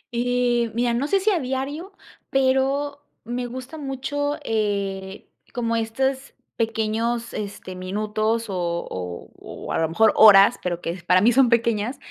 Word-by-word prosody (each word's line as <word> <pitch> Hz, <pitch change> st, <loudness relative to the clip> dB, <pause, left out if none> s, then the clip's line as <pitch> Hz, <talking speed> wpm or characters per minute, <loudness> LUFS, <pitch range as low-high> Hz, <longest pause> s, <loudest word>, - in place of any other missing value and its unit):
Y, 245 Hz, -1 st, +1 dB
mira, 240 Hz, 0 st, +1 dB
no 260 Hz, +5 st, 0 dB
sé 395 Hz, +5 st, +2 dB
si 420 Hz, +3 st, +2 dB
a 355 Hz, -, +1 dB
diario, 275 Hz, +8 st, -4 dB, 0.4 s
pero 270 Hz, +2 st, +1 dB, 0.2 s
me 245 Hz, +2 st, -4 dB
gusta 260 Hz, +5 st, -8 dB
mucho, 285 Hz, +2 st, -3 dB
eh, 200 Hz, -3 st, -2 dB, 0.3 s
como 230 Hz, -1 st, -1 dB
estos 265 Hz, +4 st, -2 dB, 0.2 s
pequeños, 225 Hz, +1 st, -1 dB
este, 200 Hz, -2 st, -6 dB
minutos 215 Hz, +4 st, -1 dB
o 195 Hz, -, -5 dB, 0.4 s
o 90 Hz, -1 st, -6 dB
o -, -, -7 dB
a -, -, 0 dB
lo 160 Hz, -1 st, +1 dB
mejor 220 Hz, +7 st, +4 dB
horas, 200 Hz, -2 st, +7 dB
pero 175 Hz, -1 st, -3 dB
que 165 Hz, -, -3 dB
para 180 Hz, +1 st, +5 dB
mí 235 Hz, +3 st, +5 dB
son 255 Hz, -1 st, +4 dB
pequeñas, 235 Hz, +1 st, +1 dB
235 Hz, 150 wpm, -23 LUFS, 210-265 Hz, 0.4 s, horas